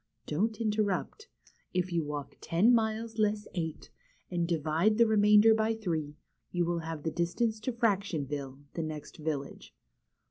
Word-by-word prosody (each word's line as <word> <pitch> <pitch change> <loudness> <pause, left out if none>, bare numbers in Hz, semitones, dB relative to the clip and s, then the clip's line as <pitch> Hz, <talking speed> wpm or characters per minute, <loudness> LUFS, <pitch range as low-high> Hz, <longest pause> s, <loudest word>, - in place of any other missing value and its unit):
Don't 210 +8 -1
interrupt. 215 - -1 0.5
If 180 0 0
you 165 -1 +1
walk 145 -1 -5
ten 195 +9 +4
miles 225 0 0
less 210 0 +1
eight, 160 -3 -4 0.4
and 170 -1 0
divide 165 +5 +2
the 235 - +6
remainder 210 0 +6
by 220 0 +1
three, 160 -8 -3 0.3
you 175 -1 0
will 170 0 0
have 160 -2 -5
the 160 - -1
distance 215 +7 0
to 240 +4 -2
Fractionville, 150 - -1
the 165 - -2
next 155 -2 -6
village." 150 -3 -5
180 Hz, 145 wpm, -30 LUFS, 160-220 Hz, 0.5 s, the